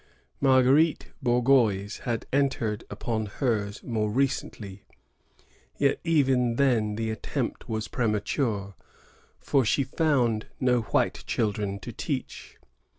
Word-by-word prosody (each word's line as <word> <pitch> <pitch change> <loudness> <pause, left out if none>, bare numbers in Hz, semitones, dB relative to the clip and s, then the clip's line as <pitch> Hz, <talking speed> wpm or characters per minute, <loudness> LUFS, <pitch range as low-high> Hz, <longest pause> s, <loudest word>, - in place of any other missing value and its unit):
Marguerite 135 +4 +4
Bourgeoys 120 -5 +2
had 115 -2 -2
entered 120 -6 0
upon 110 -2 -3
hers 105 -3 -2
more 110 -3 -1
recently; 105 -5 -2 0.9
yet 140 -1 +2
even 130 -7 +2
then 115 -6 +2
the 110 0 -2
attempt 110 - -4
was 110 -1 -2
premature, 105 -2 -1 0.7
for 135 - +2
she 130 +5 +2
found 130 -6 +1
no 125 -1 +3
white 110 - 0
children 105 -3 -1
to - - -7
teach. - - -5
120 Hz, 105 wpm, -27 LUFS, 105-135 Hz, 0.9 s, Marguerite